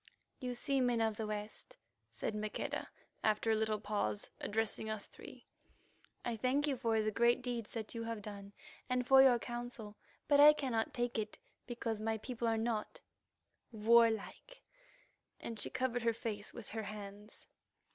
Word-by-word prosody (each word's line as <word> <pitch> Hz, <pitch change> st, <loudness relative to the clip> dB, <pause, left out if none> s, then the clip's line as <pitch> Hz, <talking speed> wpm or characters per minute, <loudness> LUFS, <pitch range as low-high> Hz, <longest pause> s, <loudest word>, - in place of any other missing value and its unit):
"You 250 Hz, -1 st, -3 dB
see, 275 Hz, +2 st, 0 dB
men 245 Hz, -2 st, +2 dB
of 220 Hz, -2 st, +1 dB
the 220 Hz, -, -2 dB
West!" 210 Hz, -, -6 dB, 0.3 s
said -, -, -3 dB
Maqueda 210 Hz, 0 st, -3 dB, 0.3 s
after 215 Hz, +1 st, +2 dB
a -, -, +4 dB
little 215 Hz, -1 st, 0 dB
pause, 200 Hz, -, -2 dB
addressing 220 Hz, 0 st, -1 dB
us 215 Hz, -1 st, -3 dB
three. -, -, -13 dB, 0.8 s
"I 240 Hz, -, -1 dB
thank 255 Hz, +6 st, +1 dB
you 285 Hz, -2 st, 0 dB
for 225 Hz, -3 st, +1 dB
the 215 Hz, -, +1 dB
great 235 Hz, +3 st, +3 dB
deeds 240 Hz, -3 st, -4 dB
that 220 Hz, -2 st, -4 dB
you 230 Hz, -, -4 dB
have 225 Hz, -2 st, -4 dB
done 200 Hz, -1 st, -8 dB, 0.4 s
and 250 Hz, 0 st, +1 dB
for 265 Hz, +1 st, +8 dB
your 260 Hz, -2 st, +7 dB
counsel. 240 Hz, -3 st, -6 dB, 0.3 s
But 285 Hz, -1 st, +5 dB
I 300 Hz, +1 st, +10 dB
cannot 250 Hz, -7 st, -1 dB
take 240 Hz, -2 st, -1 dB
it 215 Hz, 0 st, -4 dB, 0.3 s
because 230 Hz, -3 st, -3 dB
my 220 Hz, 0 st, 0 dB
people 235 Hz, +1 st, -3 dB
are 225 Hz, 0 st, +2 dB
not—warlike," 230 Hz, -, 0 dB, 0.8 s
and 230 Hz, -2 st, -6 dB
she -, -, -1 dB
covered 255 Hz, -2 st, -1 dB
her 230 Hz, 0 st, +2 dB
face 215 Hz, -2 st, -4 dB
with 235 Hz, -4 st, -9 dB
her 220 Hz, -, -3 dB
hands. 205 Hz, 0 st, -8 dB
225 Hz, 160 wpm, -35 LUFS, 215-245 Hz, 0.8 s, I